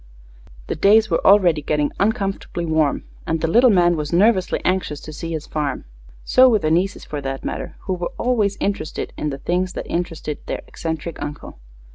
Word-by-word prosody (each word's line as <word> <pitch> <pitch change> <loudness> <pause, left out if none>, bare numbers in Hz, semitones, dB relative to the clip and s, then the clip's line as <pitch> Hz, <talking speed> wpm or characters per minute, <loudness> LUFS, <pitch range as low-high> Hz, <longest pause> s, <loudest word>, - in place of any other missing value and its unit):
The - - -3
days 215 +5 +4
were 165 - +1
already 180 -6 +5
getting 150 0 0
uncomfortably 195 -4 -1
warm, 155 -3 +1 0.2
and 160 0 0
the 165 - 0
little 240 +9 +5
man 175 -4 +4
was 150 -2 -4
nervously 190 +1 +3
anxious 180 -5 0
to 155 - -9
see 165 +2 -6
his 155 -1 -4
farm. 145 -4 -3 0.4
So 255 0 +6
were 225 - +4
the 155 -6 -1
nieces, 185 +5 0
for 145 -1 -5
that 135 0 -5
matter, - - -4
who 190 - -3
were 175 -1 -3
always 215 -5 +1
interested 200 -6 -3
in 150 - -2
the 135 - -4
things 180 +5 -1
that - - -5
interested 165 -3 -3
their - - -4
eccentric 160 0 -5
uncle. 145 - -7
170 Hz, 185 wpm, -21 LUFS, 155-195 Hz, 0.4 s, So